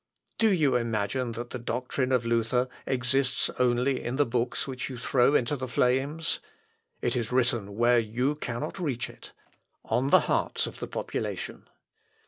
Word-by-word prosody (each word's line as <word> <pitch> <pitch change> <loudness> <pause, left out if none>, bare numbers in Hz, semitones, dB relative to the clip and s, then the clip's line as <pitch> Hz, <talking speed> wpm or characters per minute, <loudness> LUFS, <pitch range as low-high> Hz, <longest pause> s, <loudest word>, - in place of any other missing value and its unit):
Do 225 -1 +5
you 150 -9 +3
imagine 115 +1 -1
that 120 +1 -6
the 125 - -4
doctrine 125 +2 -2
of 125 -2 +2
Luther 115 +2 +1 0.2
exists 130 0 +1
only 125 +2 +2
in 120 - -2
the 145 +1 +3
books 120 +2 -1
which 130 -1 -4
you 130 - -6
throw 125 +3 +3
into 130 +3 +2
the 130 -2 -4
flames? 135 +7 +1 0.6
It - - +1
is 120 -2 -2
written 120 -5 +1
where 120 +1 +5
you 120 +6 0
cannot 150 +3 -4
reach 140 -9 -2
it - - -14 0.5
on 130 +3 +1
the - - +7
hearts - - 0
of - - -8
the - - -4
population. - - -4
125 Hz, 160 wpm, -28 LUFS, 120-135 Hz, 0.6 s, the